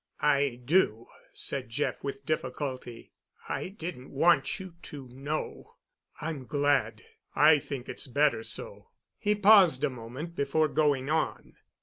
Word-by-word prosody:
"I 140 -4 +2
do," 125 - +2 0.3
said 130 -3 -4
Jeff, 145 +6 -2
with 140 0 -5
difficulty. 130 -5 -4 0.4
"I - - -3
didn't 165 -8 -7
want 170 +8 +2
you 185 -2 -9
to 140 -5 -9
know——" 140 +5 -5 0.4
"I'm 150 -5 -5
glad. 145 -1 +1 0.3
I 150 0 +6
think 135 -2 -6
it's - - -6
better 145 - +2
so." - - -3 0.3
He 210 0 +1
paused 195 -9 +6
a 150 - +2
moment 130 +8 -8
before 155 +2 +1
going 145 -1 +1
on. 160 0 -1
145 Hz, 130 wpm, -29 LUFS, 135-160 Hz, 0.4 s, I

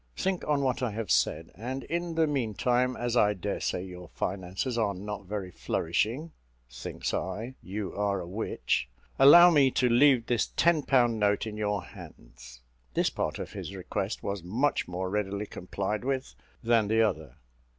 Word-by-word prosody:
Think 190 -1 -1
on 145 -2 +2
what 130 -2 0
I 125 - 0
have 110 -3 -3
said; 80 +2 +1
and, 130 +6 -5
in 170 0 -3
the 165 0 +4
meantime, 125 -2 0
as 120 0 -2
I 105 -3 +4
daresay 90 0 -2
your 90 -1 -9
finances 95 +8 -3
are 105 -4 0
not 100 0 -6
very 100 -2 -4
flourishing" 115 - -1 0.4
(thinks 65 +1 -5
I, 110 +7 -3
you 100 +1 -5
are 100 -1 0
a 85 - -6
witch!) 95 - -2 0.3
"allow 175 +6 +9
me 140 -4 +5
to 125 0 +1
leave 125 0 +5
this 120 -2 +1
ten 170 -2 +4
pound 120 -5 +2
note 105 0 +2
in 110 -1 -5
your 105 -3 -1
hands." - - -13 0.3
This - - +2
part - - -2
of - - -7
his 100 - -6
request 95 +2 -4
was 100 -1 -3
much 115 +12 0
more 90 +1 -3
readily 100 +1 -2
complied 100 +3 -4
with 135 0 -2 0.3
than 115 -2 +3
the 110 +2 +3
other. 80 - -2
105 Hz, 170 wpm, -28 LUFS, 95-130 Hz, 0.4 s, allow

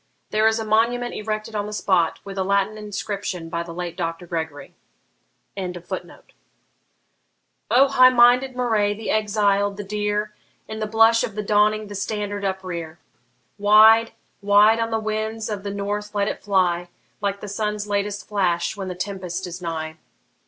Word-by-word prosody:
There 215 +1 +3
is 220 0 +2
a 225 - -3
monument 235 +3 +1
erected 215 +1 -4
on 205 -1 -2
the - - -6
spot, 185 -5 +1
with 195 -1 -8
a - - +1
Latin 200 +2 +1
inscription 200 -4 -5
by 170 0 -2
the 170 0 -7
late 175 0 -5
Doctor 165 0 -4
Gregory.] 160 -4 -5 0.8
O 190 -2 -3 2.2
high 255 -2 +6
minded 250 +1 +4
Moray! 220 -5 +1
the 220 +1 -4
exiled! 205 -2 +1
the 205 - -5
dear! 210 +1 -2 0.3
In 220 - -6
the 215 - -2
blush 225 +1 +4
of 205 - -4
the 210 - -3
dawning 210 +1 +2
the 205 - -9
STANDARD 205 0 -3
uprear! 180 -4 -4 0.6
Wide, 220 +2 +6 0.3
wide 205 +2 +5
on 230 0 0
the 225 - 0
winds 220 0 -3
of 205 -2 -3
the 200 - -5
north 205 +1 -4
let 200 0 +1
it - - -4
fly, 175 -3 +1 0.3
Like 200 -1 -1
the 210 - -8
sun's 210 +1 -2
latest 205 0 -2
flash 180 -3 0
when 195 -2 -5
the 180 - -5
tempest 185 -1 -4
is 175 0 -7
nigh! 160 -2 -4
205 Hz, 160 wpm, -23 LUFS, 190-215 Hz, 2.2 s, high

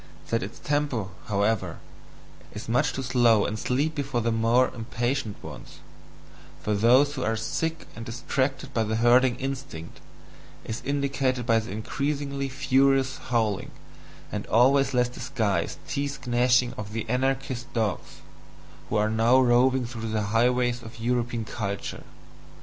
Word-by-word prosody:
That 115 - +2
its 100 +5 -6
TEMPO, 140 -10 -1 0.2
however, 105 +1 0 0.8
is 105 - -7
much 125 +5 +2
too 135 - -3
slow 120 -4 +4
and 110 +1 -3
sleepy 145 +6 0
for 135 -3 -2
the 115 0 0
more 115 +3 +3
impatient 120 -1 -2
ones, - - -10 0.8
for 105 - -1
those 125 +7 +4
who 130 -3 -3
are 110 -1 +1
sick 160 +8 -2
and 115 - -7
distracted 130 +3 -2
by 115 - +2
the 110 +1 -1
herding 120 +2 +4
instinct, 135 -11 -6 0.7
is 110 - -4
indicated 135 -3 0
by 115 -2 +4
the 110 - -7
increasingly 140 +6 -2
furious 135 0 +2
howling, 110 -5 -1 0.6
and - - -4
always 135 +3 +4
less 125 0 +3
disguised 115 -8 -2
teeth 140 -1 -3
gnashing 125 0 +3
of 105 0 -6
the 115 0 -3
anarchist 130 +1 -1
dogs, 110 -4 -2 0.7
who - - -1
are 105 0 +3
now 115 +4 +4
roving 130 +1 +4
through 115 -1 -5
the 110 -1 0
highways 125 +1 +2
of 115 0 -11
European 120 -1 -1
culture. 100 -3 -4
125 Hz, 140 wpm, -26 LUFS, 115-135 Hz, 0.8 s, slow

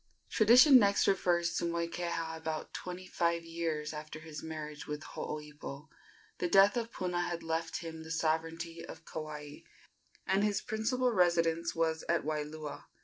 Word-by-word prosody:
Tradition 250 +5 +8
next 200 -2 +3
refers 175 -3 +2
to - - -1
Moikeha 170 -1 -2
about 160 -1 -4
twenty 180 0 -6
five 170 -2 0
years 165 -2 -3
after 155 0 -7
his 155 -1 -8
marriage 155 -2 -6
with 150 0 -4
Hooipo. 150 0 -7 0.5
The 180 - +1
death 195 +4 +6
of 235 -1 -2
Puna 180 -1 -1
had 175 -1 -3
left 165 +1 -2
him 160 -1 -7
the 160 - -10
sovereignty 165 +1 -1
of - - -10
Kauai, 150 -2 -6 0.7
and 195 +2 +2
his 205 -2 +2
principal 245 +4 0
residence 170 -4 +2
was 160 -1 0
at 170 0 +2
Waialua. 150 -1 -4
165 Hz, 145 wpm, -32 LUFS, 155-180 Hz, 0.7 s, Tradition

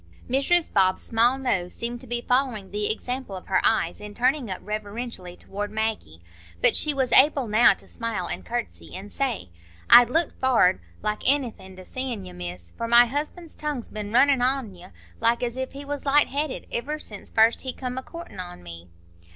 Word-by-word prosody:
Mrs 280 +7 +2
Bob's 185 -1 +2
small 235 +3 +2
nose 190 -10 -1
seemed 240 +1 -4
to 260 - -12
be 240 0 -2
following 250 -6 0
the 210 +1 0
example 250 -1 -4
of 185 - -9
her 190 - +1
eyes 225 - +1
in 210 0 -9
turning 255 -1 +1
up 185 - -3
reverentially 210 -3 -5
toward 205 +1 -5
Maggie, 215 - -3 0.4
but - - +4
she 300 - +4
was 265 -4 -1
able 275 -1 +5
now 220 +3 +5
to - - -12
smile 225 -6 -4
and - - -5
curtsey, 240 0 -5
and 195 +2 -8
say, 250 - -2 0.4
"I'd 240 -1 +9
looked 325 +4 0
forrard 240 - +3 0.2
like 210 0 -1
aenything 240 -9 0
to 185 0 -12
seein' 255 -2 -4
you, 90 - -10
Miss, 90 -1 -8
for 230 - -3
my 235 +1 +7
husband's 305 +6 -5
tongue's 295 -6 -4
been 210 -1 -6
runnin' 265 +2 +4
on 255 -4 0
you, 180 0 -13 0.3
like 230 +1 +2
as 240 -1 -2
if 260 0 -4
he 280 +1 -8
was 285 0 -4
light 290 +1 +4
headed, 290 0 -3
iver 285 +6 -2
since 210 -9 -9
first 225 +1 +3
he 260 - -3
come 250 0 -5
a - - -7
courtin' 335 - -10
on 175 - -8
me." 85 0 -10
235 Hz, 195 wpm, -25 LUFS, 205-265 Hz, 0.4 s, I'd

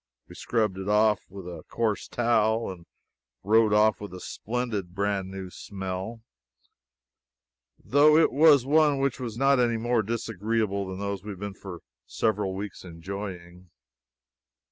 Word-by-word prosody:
We - - -13
scrubbed 105 -5 -1
it 95 +1 -4
off 105 0 +4
with 95 -1 -10
a 85 -3 -7
coarse 110 -3 -1
towel 115 -2 +1
and 85 -2 -12 0.6
rode 110 +1 +4
off 105 0 +3
with 100 -3 -7
a - - -8
splendid 105 -5 -4
brand 100 -1 -1
new 95 -1 -7
smell, 95 +4 -6 1.5
though 150 +3 +4
it 160 - +4
was 145 -3 +6
one 150 0 +4
which 135 -1 -1
was 115 -3 -5
not 135 +1 +4
any 120 -2 +2
more 120 0 +1
disagreeable 110 -2 -2
than 95 0 -6
those 100 -1 -4
we 105 - -8
have 100 -3 -7
been 100 0 -5
for 90 -2 -9 0.3
several 105 -4 -1
weeks 100 +1 -6
enjoying. 90 0 -8
105 Hz, 145 wpm, -27 LUFS, 95-115 Hz, 1.5 s, was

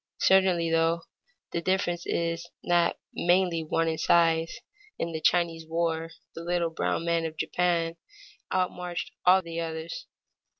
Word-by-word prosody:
Certainly, 185 -3 +4
though, 165 0 +2 0.5
the 170 - -2
difference 175 -1 0
is 170 0 -2
not 175 -1 +2 0.2
mainly 175 -2 +2
one 165 +1 0
in 160 -1 -1
size; 165 -1 +3 0.4
in 170 - -2
the 160 -1 -4
Chinese 165 -1 +1
War 165 0 -1 0.2
the 165 - -7
little 170 -1 0
brown 165 - -1
men 170 -1 +1
of 160 -1 -5
Japan 170 -1 0 0.5
outmarched 180 -2 -2 0.2
all 185 +1 +6
the 170 0 -5
others. 160 0 -5
170 Hz, 135 wpm, -27 LUFS, 165-175 Hz, 0.5 s, all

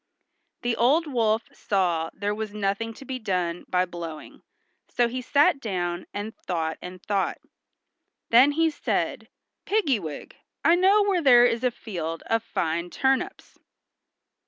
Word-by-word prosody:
The 240 -1 0
old 285 +8 +3
wolf 225 -5 +1
saw 175 -5 0
there 205 +1 -2
was 210 -1 -5
nothing 205 +2 -1
to 270 - -12
be 260 0 -4
done 180 -5 -2
by 180 0 +2
blowing, 170 -3 -8 0.5
so 240 - +2
he 255 +2 -4
sat 290 +5 +3
down 180 -6 -3
and 205 +2 -5
thought 160 -3 -3
and 180 0 -9
thought. 200 -2 -1 0.9
Then 255 +5 +7
he 325 +1 +2
said, - - -2 0.3
"Piggy 350 - +1
wig, 155 -5 -8 0.3
I 330 - +6
know 385 +4 +5
where 390 -3 +1
there 245 -5 +7
is 235 0 0
a 250 - +4
field 170 -9 -6
of 225 0 +1
fine 170 -5 -2
turnips." 270 - -1
220 Hz, 145 wpm, -25 LUFS, 180-265 Hz, 0.9 s, Then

